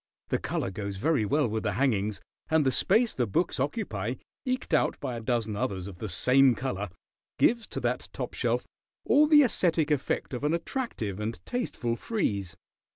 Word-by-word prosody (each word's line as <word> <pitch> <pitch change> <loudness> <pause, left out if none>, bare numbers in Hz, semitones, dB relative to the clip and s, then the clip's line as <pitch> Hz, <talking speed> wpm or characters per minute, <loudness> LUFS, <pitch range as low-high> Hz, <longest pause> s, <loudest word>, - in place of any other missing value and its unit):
The - - +1
color 95 - -2
goes 100 0 -5
very 140 0 +2
well 145 +5 +2
with 110 0 -2
the 105 -3 -1
hangings, 105 -4 +1 0.3
and 160 -2 +3
the 130 - +4
space 220 - +3
the 120 -3 0
books 165 - 0
occupy, 130 - -2 0.3
eked 255 -8 -2
out 155 - +2
by 125 - -3
a 115 - -5
dozen 110 -2 -1
others 95 -3 -2
of 95 -3 -10
the 110 - -4
same 130 +7 +4
color, 105 -7 -3 0.5
gives 235 -1 +3
to - - -4
that - - -1
top - - -5
shelf - - 0 0.4
all 300 +1 +5
the 300 -1 +7
esthetic 165 - +1
effect 140 -1 -1
of 125 - -4
an 150 +3 +2
attractive 165 - -3
and 110 +2 -3
tasteful 180 - -2
frieze. 100 - -2
125 Hz, 180 wpm, -28 LUFS, 105-165 Hz, 0.5 s, the